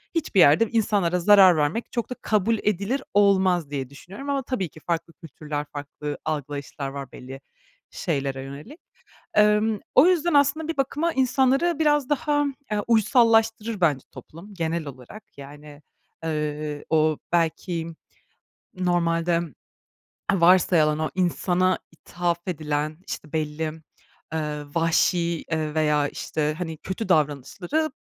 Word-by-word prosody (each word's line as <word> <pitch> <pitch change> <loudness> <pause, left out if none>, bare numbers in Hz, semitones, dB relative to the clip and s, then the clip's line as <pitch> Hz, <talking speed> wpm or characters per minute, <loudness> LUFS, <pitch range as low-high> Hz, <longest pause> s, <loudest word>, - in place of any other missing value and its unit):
hiçbir 290 - 0
yerde 160 +10 +6
insanlara 200 -6 +1
zarar 190 -2 +7
vermek 150 +11 -1
çok 235 0 -3
da 250 - -4
kabul 215 +1 +1
edilir 210 +7 -1
olmaz 190 -6 +3
diye 135 -3 -4
düşünüyorum 195 - -10
ama, 275 -2 0
tabii 215 - -3
ki 155 - -15
farklı 165 0 -3
kültürler, 150 -2 -6
farklı 145 0 -6
algılayışlar 145 -2 -4
var 135 -1 -7
belli 135 +2 -10 0.5
şeylere 135 -5 -2
yönelik. 150 - -10 0.6
Emm, 210 0 +3 0.2
o 275 +6 +7
yüzden 345 -3 +2
aslında 290 +3 +3
bir 330 - -3
bakıma 295 +5 0
insanları 265 +5 +2
biraz 295 -3 +2
daha, 290 0 +1 0.3
eee, 210 - +1
uysallaştırır 225 -2 +3
bence 145 -6 +2
toplum 195 +6 -12
genel 165 -2 -2
olarak. 135 - -10 0.2
Yani, 145 +1 -12 0.4
ııı, 150 -1 -3
o 155 -1 +2
belki 165 0 -1 0.8
normalde 170 -1 +1 0.9
varsayılan 170 -4 +4
o 155 - -1
insana 185 0 +1
ithaf 170 +1 -3
edilen 155 -1 -2
işte 150 - -7
belli, 155 0 -2 0.6
ııı, 150 -2 -3
vahşi, 170 0 +1
ııı, 155 -1 -1
veya 150 -2 +2
işte, 150 -1 -2
hani, 160 -3 -4
kötü 190 +2 -5
davranışları 175 - 0
170 Hz, 125 wpm, -24 LUFS, 150-220 Hz, 0.9 s, zarar